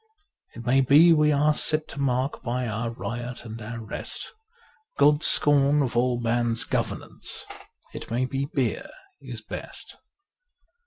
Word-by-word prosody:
It 115 Hz, -, -9 dB
may 135 Hz, +2 st, +4 dB
be 150 Hz, +6 st, +6 dB
we 150 Hz, -1 st, +3 dB
are 150 Hz, +1 st, +3 dB
set 155 Hz, +1 st, +2 dB
to 140 Hz, -, -6 dB
mark 130 Hz, +1 st, -1 dB
by 125 Hz, +1 st, -2 dB
our 115 Hz, +2 st, -3 dB
riot 120 Hz, +1 st, -6 dB
and 115 Hz, 0 st, -8 dB
our 115 Hz, +2 st, -6 dB
rest 110 Hz, -, -6 dB, 0.6 s
God's 145 Hz, +2 st, +4 dB
scorn 145 Hz, 0 st, +4 dB
of 125 Hz, -3 st, -3 dB
all 120 Hz, 0 st, +1 dB
man's 120 Hz, 0 st, +1 dB
governance: -, -, -3 dB, 0.5 s
it -, -, -8 dB
may 120 Hz, +3 st, 0 dB
be 135 Hz, +1 st, -2 dB
beer 130 Hz, -6 st, -1 dB, 0.3 s
is -, -, -8 dB
best. -, -, -8 dB
125 Hz, 145 wpm, -25 LUFS, 120-145 Hz, 0.6 s, be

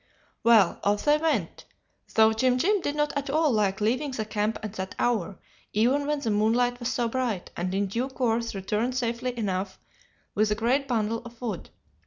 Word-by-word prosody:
"Well, 220 Hz, -6 st, +5 dB
off 205 Hz, +1 st, +1 dB
they 295 Hz, 0 st, +5 dB
went, 285 Hz, -, -1 dB, 0.5 s
though 220 Hz, 0 st, +6 dB
Jim 250 Hz, +3 st, +2 dB
Jim 400 Hz, +8 st, +2 dB
did 290 Hz, -2 st, -2 dB
not 295 Hz, -1 st, 0 dB
at 280 Hz, -1 st, -2 dB
all 310 Hz, +1 st, +2 dB
like 205 Hz, -4 st, +1 dB
leaving 250 Hz, +8 st, 0 dB
the 235 Hz, -5 st, -3 dB
camp 210 Hz, +1 st, -1 dB
at 215 Hz, -2 st, -5 dB
that 190 Hz, -2 st, -5 dB
hour, 210 Hz, -6 st, 0 dB, 0.4 s
even 255 Hz, +7 st, +2 dB
when 295 Hz, -1 st, 0 dB
the 230 Hz, -5 st, -1 dB
moonlight 240 Hz, +4 st, +2 dB
was 240 Hz, 0 st, -2 dB
so 240 Hz, -2 st, 0 dB
bright, 230 Hz, -6 st, -2 dB
and 180 Hz, +1 st, -2 dB
in 200 Hz, +1 st, +1 dB
due 235 Hz, +7 st, -2 dB
course 235 Hz, -3 st, -1 dB
returned 210 Hz, +6 st, -1 dB
safely 245 Hz, 0 st, -2 dB
enough 190 Hz, -3 st, -2 dB, 0.6 s
with 215 Hz, 0 st, +2 dB
a 210 Hz, -, +1 dB
great 255 Hz, +6 st, +1 dB
bundle 230 Hz, -2 st, 0 dB
of 235 Hz, -1 st, -12 dB
wood. 220 Hz, -8 st, -5 dB
230 Hz, 190 wpm, -26 LUFS, 210-255 Hz, 0.6 s, though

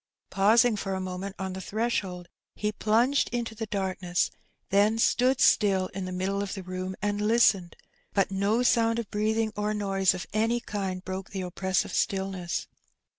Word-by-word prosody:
Pausing 220 Hz, +4 st, +4 dB
for 195 Hz, -2 st, -3 dB
a -, -, -2 dB
moment 185 Hz, +1 st, -5 dB
on 190 Hz, -1 st, -4 dB
the 190 Hz, -, -5 dB
threshold^ 195 Hz, -3 st, -2 dB, 0.3 s
he 210 Hz, 0 st, -1 dB
plunged 230 Hz, +7 st, +2 dB
into 235 Hz, -2 st, -3 dB
the 220 Hz, 0 st, -5 dB
dq,rkness, 185 Hz, -3 st, -1 dB, 0.4 s
then 205 Hz, +3 st, +4 dB
stood 250 Hz, +3 st, +3 dB
still 190 Hz, -3 st, +4 dB
in 195 Hz, -1 st, -5 dB
the 185 Hz, -, -5 dB
middle 190 Hz, +2 st, -1 dB
of 200 Hz, -1 st, -4 dB
the 190 Hz, -, -6 dB
room 185 Hz, +1 st, -5 dB
and 205 Hz, 0 st, 0 dB
listened; 210 Hz, -5 st, +3 dB, 0.4 s
but 195 Hz, -1 st, +1 dB
no 200 Hz, +5 st, +1 dB
sound 230 Hz, -2 st, +3 dB
of 235 Hz, -3 st, -4 dB
breathing 215 Hz, +1 st, 0 dB
or 210 Hz, +1 st, -1 dB
noise 195 Hz, -2 st, +1 dB
of 180 Hz, -, -5 dB
any 225 Hz, +3 st, +1 dB
kind 190 Hz, -5 st, -4 dB
broke 190 Hz, 0 st, -5 dB
the 195 Hz, -, -4 dB
oppressive 185 Hz, 0 st, -1 dB
stillness. 190 Hz, -2 st, -1 dB
200 Hz, 170 wpm, -27 LUFS, 190-220 Hz, 0.4 s, Pausing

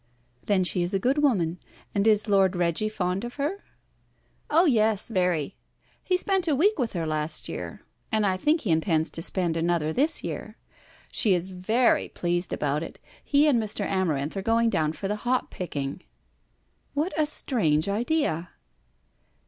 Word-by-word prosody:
"Then 195 Hz, -3 st, +3 dB
she 180 Hz, 0 st, -1 dB
is 175 Hz, +3 st, -1 dB
a -, -, +2 dB
good 260 Hz, +8 st, +1 dB
woman. 180 Hz, -, +1 dB, 0.3 s
And 200 Hz, +2 st, +1 dB
is 215 Hz, 0 st, +3 dB
Lord 195 Hz, -2 st, +3 dB
Reggie 175 Hz, +4 st, 0 dB
fond 190 Hz, -1 st, -2 dB
of 240 Hz, 0 st, -6 dB
her?" 305 Hz, +8 st, -3 dB, 0.9 s
"Oh 330 Hz, +4 st, +5 dB
yes, 220 Hz, -, +3 dB
very. 180 Hz, -4 st, 0 dB, 0.5 s
He 365 Hz, -, +1 dB
spent 380 Hz, -1 st, 0 dB
a 300 Hz, -, +3 dB
week 390 Hz, +6 st, +2 dB
with 240 Hz, -3 st, -1 dB
her 170 Hz, -3 st, -2 dB
last 155 Hz, 0 st, -2 dB
year, -, -, -6 dB, 0.3 s
and 215 Hz, -1 st, +2 dB
I 190 Hz, -2 st, +2 dB
think 305 Hz, -, +1 dB
he 200 Hz, -, -1 dB
intends 160 Hz, 0 st, +1 dB
to 165 Hz, -, -4 dB
spend 175 Hz, -1 st, 0 dB
another 165 Hz, -2 st, 0 dB
this 300 Hz, +5 st, +1 dB
year. -, -, -6 dB, 0.5 s
She 205 Hz, -6 st, +3 dB
is 175 Hz, +2 st, -3 dB
very 215 Hz, +7 st, +1 dB
pleased 175 Hz, 0 st, -2 dB
about 145 Hz, +1 st, -1 dB
it. -, -, -7 dB, 0.3 s
He 290 Hz, +1 st, +3 dB
and 250 Hz, -6 st, +3 dB
Mr. 210 Hz, -1 st, -2 dB
Amarinth 160 Hz, -6 st, -1 dB
are 195 Hz, -, -2 dB
going 230 Hz, +2 st, +2 dB
down 155 Hz, -5 st, +1 dB
for 195 Hz, -, -5 dB
the 210 Hz, +1 st, -2 dB
hop 250 Hz, +3 st, -1 dB
picking." 145 Hz, -3 st, -4 dB, 0.9 s
"What 310 Hz, +6 st, 0 dB
a 310 Hz, -1 st, +2 dB
strange 165 Hz, -, 0 dB
idea!" 205 Hz, -, 0 dB
195 Hz, 170 wpm, -26 LUFS, 170-245 Hz, 0.9 s, Oh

